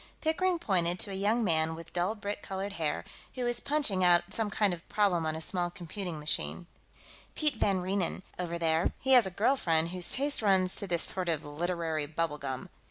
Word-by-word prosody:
Pickering 350 +3 +1
pointed 180 - +1
to 200 - 0
a - - -4
young 210 +5 +1
man 160 -4 +2
with 165 0 -11
dull 180 +5 0
brick 205 -1 -4
colored 195 +1 -4
hair, 160 -5 -2 0.3
who 255 - -2
was 240 0 +2
punching 275 -12 +1
out 175 +1 +4
some 220 -1 0
kind 205 -2 +2
of 175 - -5
a - - -22
problem 190 -6 +2
on 155 - -1
a 160 - -5
small 175 +1 -1
computing 175 -1 -6
machine. 150 +3 -1 0.7
"Piet 300 -2 +3
van 195 -5 +1
Reenen, 190 0 -1 0.2
over 170 -1 -2
there, 165 0 +1
he 265 - -1
has 245 -6 +7
a - - -2
girl 215 +9 +2
friend 165 -8 +1
whose 180 0 -4
taste 280 0 0
runs 190 -3 +3
to 200 - -3
this 170 -2 +2
sort 185 -2 -1
of 160 -3 0
literary 160 0 -2
bubble 155 -1 -2
gum. 135 -2 -5
185 Hz, 210 wpm, -30 LUFS, 165-210 Hz, 0.7 s, has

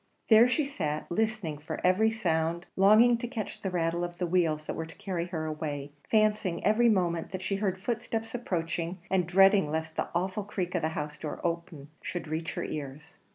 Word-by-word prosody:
There 230 +2 +8
she 295 +3 +1
sat, 155 - -3
listening 215 -6 -1
for 150 - -5
every 195 +5 +4
sound 170 -5 -1
longing 220 +5 +6
to 240 - -3
catch 225 -5 -5
the 190 - -2
rattle 170 -1 0
of 175 0 -5
the 180 - -1
wheels 165 -3 +1
that - - -3
were 160 - -4
to 165 - -13
carry 190 -4 -3
her 160 -3 -3
away 150 -2 -4 0.2
fancying 215 -5 +2
every 225 +4 +5
moment 175 -5 +1
that 185 0 -5
she 195 0 -1
heard 195 -2 -1
footsteps 225 +1 -3
approaching, 170 -6 -2
and 185 -3 +2
dreading 195 -1 +5
lest 160 +1 -3
the - - -1
awful 190 +4 -1
creak 185 -3 -3
of 175 - 0
the 155 - 0
house 150 0 -4
door 155 - -5
opening 170 -4 -3
should 175 -2 -5
reach 160 +3 -3
her 175 - -2
ears. 150 +1 -7
180 Hz, 200 wpm, -29 LUFS, 160-210 Hz, 0.2 s, There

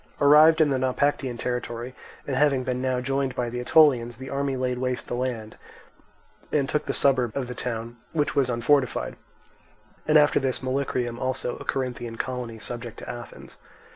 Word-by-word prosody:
Arrived 155 +3 +7
in 155 -3 +4
the 135 - +1
Naupactian 130 -1 0
territory, 125 0 -4 0.3
and 135 - -2
having 135 -1 +3
been 125 0 -2
now 130 -1 0
joined 135 0 -1
by 120 -1 -2
the 125 - -4
Aetolians, 125 -4 +4
the 130 +1 -8
army 140 0 -1
laid 125 -1 -1
waste 125 -1 -2
the - - -4
land 120 -3 -3 0.9
and 140 -3 +1
took 150 - -1
the - - +1
suburb 130 -4 +2
of 130 -3 -2
the 125 - -5
town, 120 -1 -5
which 150 -3 0
was 135 -3 +2
unfortified; 125 +3 +1 0.9
and 155 0 +6
after 150 -1 +5
this 130 -1 -2
Molycrium 130 -2 -1
also, 130 -1 -2
a - - -10
Corinthian 125 -3 -3
colony 125 -2 -4
subject 120 +1 -6
to - - -9
Athens. 120 -1 -9
130 Hz, 170 wpm, -25 LUFS, 120-140 Hz, 0.9 s, Arrived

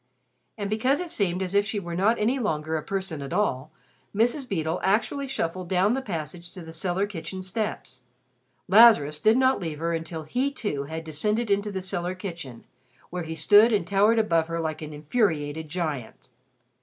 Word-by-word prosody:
And 205 -2 -3
because 235 +7 +1
it 355 -2 -5
seemed 190 - 0
as 185 0 -3
if 200 0 +4
she 205 +1 -3
were 175 -3 -6
not 210 +6 +3
any 240 +6 +1
longer 160 -8 -1
a 155 - -1
person 190 -4 -4
at 135 -1 -6
all, 155 -8 0 0.4
Mrs. 245 +5 +1
Beedle 160 -3 -1
actually 235 +8 0
shuffled 180 -7 -3
down 190 +4 +3
the 265 - -1
passage 170 -4 -6
to 185 - -9
the 160 0 -10
cellar 180 +4 0
kitchen 185 -1 -6
steps. 185 - -4 0.7
Lazarus 185 -8 +6
did 220 +2 +5
not 260 0 +3
leave 160 -4 -4
her 165 +2 -1
until 165 -1 -4
he, 250 - 0
too, 205 - -3
had 160 +2 -6
descended 210 +9 -1
into 200 +1 +1
the 190 -1 -4
cellar 180 -1 -2
kitchen, 170 - -7 0.5
where 180 0 -3
he 160 -1 -5
stood 205 +8 +6
and 205 -6 +1
towered 200 +5 +3
above 165 -7 +2
her 165 0 -3
like 155 -1 -3
an 155 0 -6
infuriated 155 -2 -1
giant. 150 -9 -4
185 Hz, 185 wpm, -26 LUFS, 160-210 Hz, 0.7 s, Lazarus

